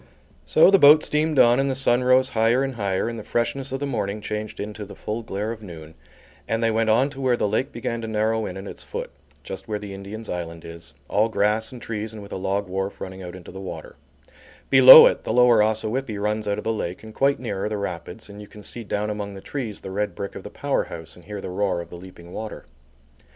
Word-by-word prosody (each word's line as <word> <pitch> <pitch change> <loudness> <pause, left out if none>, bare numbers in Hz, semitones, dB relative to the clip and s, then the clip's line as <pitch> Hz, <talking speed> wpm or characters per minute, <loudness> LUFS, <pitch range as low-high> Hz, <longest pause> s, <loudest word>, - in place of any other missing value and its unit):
So 160 - +6
the 195 - +6
boat 150 +1 +8
steamed 150 0 0
on 120 +1 +6
and 135 0 +1
the 135 - -1
sun 125 -2 +2
rose 130 +1 +4
higher 115 +4 +2
and 135 -1 -2
higher, 100 -3 -1
and 115 -1 -4
the - - -8
freshness 130 +4 -2
of 135 - -2
the 145 - -2
morning 110 -6 -2
changed 105 +1 -5
into 105 +1 -5
the 100 - -10
full 110 +2 -4
glare 105 0 -4
of 115 -1 -7
noon, 80 -5 -10 0.5
and 115 +1 -1
they 115 - +3
went 110 0 +1
on 125 +6 +3
to 135 -1 -8
where 125 -2 +2
the - - +1
lake 110 +7 -1
began 115 0 -4
to 115 - -5
narrow 110 0 0
in - - -6
at 95 - -8
its - - -8
foot, - - -6 0.3
just 95 - -7
where 105 -1 -2
the 105 -1 -8
Indian's 100 +3 -8
Island 85 -2 -5
is, 85 -1 -10
all 110 +3 +2
grass 110 +1 +1
and 125 - -9
trees 110 -1 -5
and 110 - -8
with 100 - -12
a - - -3
log 95 +1 -1
wharf 95 +2 -3
running 95 0 -7
into 90 -1 -9
the 95 +1 -8
water: 485 - -8 0.8
Below - - +11
it - - +2
the - - -3
Lower 125 -3 +6
Ossawippi 110 +2 -1
runs 105 +1 -2
out 100 0 0
of 105 - -5
the 115 - 0
lake, 90 -3 -4
and 110 0 -10
quite 140 +3 +2
near 105 -6 -4
are - - -1
the 105 - -2
rapids, 90 +1 -6
and 100 0 -11
you 105 - -10
can 105 0 -13
see 120 - -5
down 105 0 -2
among 100 -1 -5
the - - -8
trees 115 -1 -5
the 95 - -7
red 105 +2 -2
brick 100 0 -5
of - - -8
the - - -9
power - - -1
house 80 -1 -9
and 90 - -17
hear 105 0 -6
the - - -6
roar 95 -2 0
of 85 - -8
the - - -8
leaping 90 -1 -13
water. 110 -1 -7
105 Hz, 250 wpm, -23 LUFS, 100-120 Hz, 0.8 s, Below